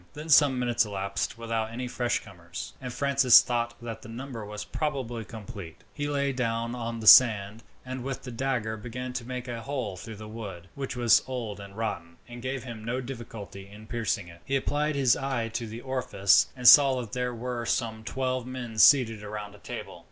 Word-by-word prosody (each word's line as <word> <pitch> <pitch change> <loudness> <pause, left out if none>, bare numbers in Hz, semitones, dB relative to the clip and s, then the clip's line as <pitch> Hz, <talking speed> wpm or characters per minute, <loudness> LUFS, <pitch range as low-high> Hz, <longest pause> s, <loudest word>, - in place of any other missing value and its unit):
Then 150 +2 -8
some 140 -3 +6
minutes 120 -2 +2
elapsed 100 0 -3
without 115 -1 -2
any 125 +2 -5
fresh 120 0 -1
comers, 90 -3 -8
and 125 -1 -5
Francis 135 -2 +6
thought 120 -1 -1
that 115 -1 -6
the 110 - -11
number 120 -1 -7
was 105 0 -6
probably 130 -7 -3
complete. 100 -6 -10
He 145 -1 -3
lay 140 -1 0
down 115 -2 -1
on 115 -1 -4
the - - -6
sand, 110 -2 +7 0.2
and 130 -1 -5
with 135 0 -5
his 125 - -7
dagger 115 -3 -1
began 125 +3 -6
to 125 - -4
make 125 +1 -6
a 120 -1 -5
hole 125 -7 -3
through 110 +4 -9
the 105 +1 -9
wood, 100 -5 -8
which 135 -2 -5
was 120 -3 +5
old 115 -6 -4
and 100 0 -11
rotten, 85 -7 -4
and 120 0 -9
gave 130 0 -3
him 115 -4 -8
no 120 +3 -2
difficulty 115 -6 -8
in 105 +2 -13
piercing 110 -5 -2
it. 85 0 -14
He 135 - -1
applied 150 +2 0
his 135 -4 +4
eye 130 -4 -2
to 115 +1 -4
the 110 +2 -8
orifice, 125 -7 +3
and 125 -1 +1
saw 135 -1 +9
that 115 -4 -6
there 125 -1 -2
were 120 0 -4
some 110 -2 -1
twelve 130 +1 -2
men 120 -4 -6
seated 115 -5 +6
round 105 -1 -6
a 105 - -15
table. - - -8
120 Hz, 200 wpm, -28 LUFS, 110-130 Hz, 0.2 s, saw